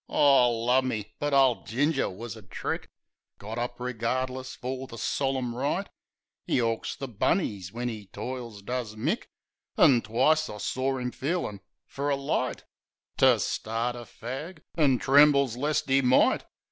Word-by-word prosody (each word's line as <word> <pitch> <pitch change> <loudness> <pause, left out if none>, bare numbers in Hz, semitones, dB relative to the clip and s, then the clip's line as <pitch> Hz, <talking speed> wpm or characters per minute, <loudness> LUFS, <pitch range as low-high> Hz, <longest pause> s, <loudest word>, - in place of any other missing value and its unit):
O, 135 -4 +5
lumme! 125 -3 +2 0.2
But 145 0 -1
ole 135 -3 +4
Ginger 140 +4 0
was 115 +4 -7
a 110 - -11
trick! 100 - -4 0.5
Got 110 +3 -6
up 120 0 -4
regardless 130 +2 -2
fer 130 +2 -5
the 115 - -9
solim 130 +1 -1
rite. 145 +10 -1 0.6
('E - - +3
'awks 115 -1 -1
the 135 - -5
bunnies 105 - -1
when 120 +3 -3
'e 110 -4 -6
toils, 120 -2 -6
does 120 -1 -3
Mick) 155 - -1 0.5
An' 130 -7 +6
twice 145 +9 +2
I 105 - -6
saw 130 +5 -1
'im 125 0 -3
feelin' 135 - -3 0.2
fer 140 +1 -3
a 140 - +3
light 140 0 -2 0.5
To - - +5
start 115 +2 -2
a 120 -1 -8
fag; 150 +10 -7
an' 140 -6 +3
trembles 140 -2 +5
lest 145 +4 0
'e 135 +1 +5
might. 125 0 +4
125 Hz, 150 wpm, -27 LUFS, 115-140 Hz, 0.6 s, An